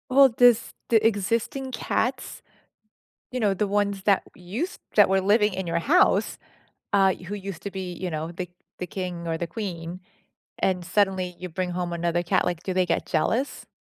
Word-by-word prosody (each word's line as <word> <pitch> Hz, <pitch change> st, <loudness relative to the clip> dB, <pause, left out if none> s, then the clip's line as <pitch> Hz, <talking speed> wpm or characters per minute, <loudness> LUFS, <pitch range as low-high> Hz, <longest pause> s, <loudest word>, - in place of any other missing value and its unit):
Well, 275 Hz, +1 st, +8 dB
does 245 Hz, -1 st, +4 dB, 0.2 s
the 225 Hz, -2 st, +4 dB
existing 230 Hz, +5 st, -1 dB
cats, 250 Hz, +2 st, -2 dB, 0.9 s
you 255 Hz, -, -2 dB
know, 205 Hz, -3 st, +2 dB
the 205 Hz, +2 st, 0 dB
ones 200 Hz, -1 st, 0 dB
that 200 Hz, 0 st, +3 dB
used 220 Hz, -, -4 dB, 0.2 s
that -, -, +6 dB
were 190 Hz, 0 st, +2 dB
living 210 Hz, +1 st, +3 dB
in 190 Hz, -1 st, -3 dB
your 170 Hz, 0 st, 0 dB
house, 315 Hz, -, +3 dB, 0.6 s
uh, 195 Hz, -2 st, +4 dB
who 180 Hz, +3 st, -8 dB
used 195 Hz, -3 st, -6 dB
to 200 Hz, -, -4 dB
be, 185 Hz, -2 st, -5 dB
you 180 Hz, +1 st, -4 dB
know, 160 Hz, +2 st, -4 dB
the 180 Hz, 0 st, -5 dB, 0.3 s
the 180 Hz, -, -2 dB
king 180 Hz, -2 st, -5 dB
or 165 Hz, -1 st, -1 dB
the 170 Hz, -, -3 dB
queen, 175 Hz, -2 st, -5 dB, 0.6 s
and 180 Hz, -2 st, 0 dB
suddenly 185 Hz, -1 st, +1 dB
you 180 Hz, -, -6 dB
bring 180 Hz, +2 st, -3 dB
home 175 Hz, 0 st, -2 dB
another 170 Hz, 0 st, 0 dB
cat, 175 Hz, -, +2 dB
like, 175 Hz, -2 st, -2 dB
do 190 Hz, -, -2 dB
they 185 Hz, 0 st, +2 dB
get -, -, 0 dB
jealous? 260 Hz, +5 st, -1 dB
190 Hz, 185 wpm, -25 LUFS, 175-210 Hz, 0.9 s, Well